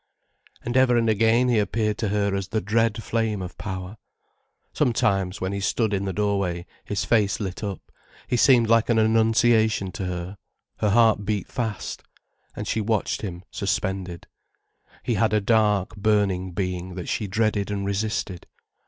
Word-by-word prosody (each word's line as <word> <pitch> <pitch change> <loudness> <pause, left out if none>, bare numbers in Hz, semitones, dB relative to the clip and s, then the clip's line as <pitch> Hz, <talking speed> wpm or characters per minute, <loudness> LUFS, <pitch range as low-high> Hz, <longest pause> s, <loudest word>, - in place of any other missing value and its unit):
And 120 +1 -4
ever 125 -2 +4
and 115 -1 +2
again 115 +3 +3
he 120 -3 +3
appeared 105 +1 -1
to 110 - 0
her 100 0 0
as 100 -1 -2
the 110 +2 -1
dread 115 +3 0
flame 110 -3 -1
of 90 -1 -6
power. 95 +1 -6 0.8
Sometimes, 100 -5 +1
when 95 +1 -2
he 100 - -2
stood 110 +2 0
in 100 0 -1
the 95 - -1
doorway, 100 -3 -1 0.2
his 105 - -2
face 105 -4 +2
lit 95 -1 -5
up, 100 -3 -6 0.4
he - - 0
seemed 120 -1 +5
like 115 +1 +3
an 115 - +3
Annunciation 110 -2 +3
to 95 - -5
her, 90 +2 -5 0.4
her 105 - +1
heart 110 -1 +4
beat 100 -2 -2
fast. 110 -5 -4 0.5
And 105 - -5
she 110 - 0
watched 110 0 -1
him, 90 -4 -6
suspended. 95 -3 -3 0.8
He 120 - 0
had 110 +1 +1
a 105 - +4
dark, 105 -1 +2
burning 100 -3 +1
being 90 -1 -3
that 90 - -6
she 105 - -2
dreaded 105 0 0
and 100 -1 -2
resisted. 100 -2 -3
105 Hz, 165 wpm, -24 LUFS, 95-110 Hz, 0.8 s, seemed